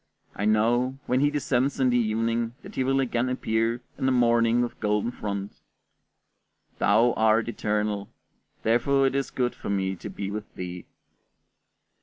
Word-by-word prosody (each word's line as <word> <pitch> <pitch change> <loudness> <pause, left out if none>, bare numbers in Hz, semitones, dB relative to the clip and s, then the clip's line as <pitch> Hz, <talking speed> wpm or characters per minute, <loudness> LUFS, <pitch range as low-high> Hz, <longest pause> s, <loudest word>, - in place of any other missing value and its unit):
I 100 - -2
know, 120 +5 +2
when 125 +1 +1
he 145 +1 +3
descends 140 -2 0
in 130 -1 +3
the 120 - +3
evening, 115 +1 0
that - - -10
he 130 - 0
will 135 +1 +1
again 125 -1 0
appear 115 -1 -1 0.2
in 130 - +1
the - - +3
morning 120 -1 +3
with 120 - -5
golden 105 +2 0
front. 100 -4 -5 1.2
Thou 115 +4 +4
art 110 +1 +3
eternal, 105 -2 -2 0.5
therefore 135 +5 +3
it 135 - +1
is 140 0 -1
good 125 -1 -1
for - - -7
me 95 -1 0
to - - -7
be 100 0 -5
with 105 +1 -6
thee. 90 -1 -7
115 Hz, 160 wpm, -26 LUFS, 105-125 Hz, 1.2 s, Thou